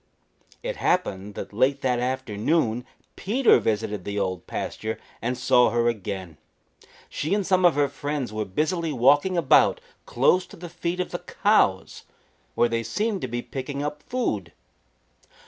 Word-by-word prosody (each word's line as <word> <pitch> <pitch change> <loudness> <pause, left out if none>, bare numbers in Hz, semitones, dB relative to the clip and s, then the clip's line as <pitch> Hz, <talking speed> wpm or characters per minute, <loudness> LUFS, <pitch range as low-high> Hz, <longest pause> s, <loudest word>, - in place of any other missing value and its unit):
It - - -3
happened 105 - -1
that - - -7
late 135 +6 +2
that 125 -2 +1
afternoon 125 0 -1 0.3
Peter 240 +7 +3
visited 105 -3 -2
the 100 +2 -4
Old 95 -2 -2
Pasture 110 0 -4 0.2
and 125 +2 -2
saw 125 -1 +4
her 120 0 +1
again. 95 -7 -4 0.7
She 155 +7 -1
and 205 -2 -1
some 185 -1 +3
of 175 - +5
her 145 -1 +3
friends 140 -3 -4
were 110 0 -1
busily 160 - -1
walking 145 +8 +3
about 160 -6 +4 0.3
close 180 +9 +2
to - - -13
the 175 0 -8
feet 175 +1 -3
of 180 - -2
the - - -3
cows, - - +1 0.5
where 120 - +4
they 115 0 -1
seemed 200 - -2
to - - -2
be 120 0 -4
picking 140 +1 -5
up 150 0 -4
food. 250 0 -3
130 Hz, 155 wpm, -25 LUFS, 110-170 Hz, 0.7 s, of